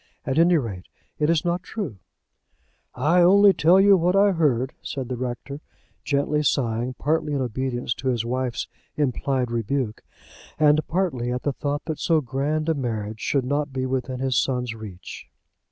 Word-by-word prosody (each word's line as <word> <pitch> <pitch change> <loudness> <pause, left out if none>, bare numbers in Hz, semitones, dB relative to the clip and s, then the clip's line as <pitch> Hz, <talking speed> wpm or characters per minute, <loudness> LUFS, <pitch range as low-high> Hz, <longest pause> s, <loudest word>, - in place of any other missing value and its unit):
At 135 +4 0
any 170 +1 +5
rate, 105 - -4 0.3
it 150 0 +2
is 165 -1 +2
not 175 +1 0
true." 185 - -6 1.0
"I 175 +4 +3
only 200 +3 +7
tell 170 +3 +5
you 200 0 +7
what 180 +1 +2
I 200 +1 +5
heard," 135 -7 +1
said 130 -3 -5
the 130 - -2
rector, 130 +3 -5 0.4
gently 145 +1 0
sighing, 125 -3 0
partly 155 +1 -1
in 140 - 0
obedience 125 0 -2
to 130 - -4
his 120 -3 0
wife's 125 0 -2 0.3
implied 130 -3 -1
rebuke, 115 0 -2 0.6
and 150 0 +5
partly 155 -10 -1
at 125 0 -3
the 145 - 0
thought 145 +2 -3
that 160 -2 -4
so 165 -3 +2
grand 145 +3 -2
a 165 - +3
marriage 110 -6 -4
should 135 +2 0
not 145 +2 -1
be 130 -1 -2
within 130 0 -2
his 130 -1 0
son's 125 -3 -1
reach. 105 -5 -9
135 Hz, 170 wpm, -24 LUFS, 125-155 Hz, 1.0 s, only